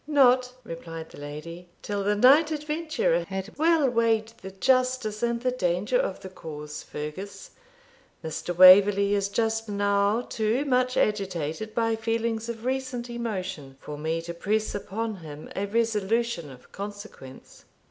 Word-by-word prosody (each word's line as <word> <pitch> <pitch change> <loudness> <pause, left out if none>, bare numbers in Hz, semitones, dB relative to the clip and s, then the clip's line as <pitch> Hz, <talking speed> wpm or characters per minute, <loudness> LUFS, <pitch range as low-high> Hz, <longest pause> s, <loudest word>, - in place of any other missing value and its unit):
'Not,' 255 -4 +4
replied 165 -1 -8
the - - -12
lady, 165 +5 -8
'till 205 -1 -2
the 205 +1 +2
knight 275 +9 +6
adventurer 320 +11 -1
had 190 +2 -5
well 320 -3 +4
weighed 230 -2 +1
the 190 - -7
justice 250 +1 +1
and 235 0 0
the 255 0 +1
danger 185 - 0
of - - -2
the 190 - -8
cause, 150 -4 -8
Fergus. 190 - -7 0.7
Mr. 160 +2 -4
Waverley 200 +2 +8
is 200 -1 +1
just 225 +1 -1
now 200 +2 +2
too 235 +3 -1
much 255 -2 +1
agitated 195 0 -1
by 225 -1 +1
feelings 225 0 -2
of 230 0 -6
recent 255 -2 -3
emotion 185 - -5
for 150 - -7
me 160 +2 -2
to 170 0 -6
press 210 +5 -1
upon 215 +2 -4
him 155 -3 -10
a 200 +1 -2
resolution 225 -4 0
of 125 -2 -15
consequence.' 205 -10 -10
210 Hz, 145 wpm, -26 LUFS, 180-240 Hz, 0.7 s, Waverley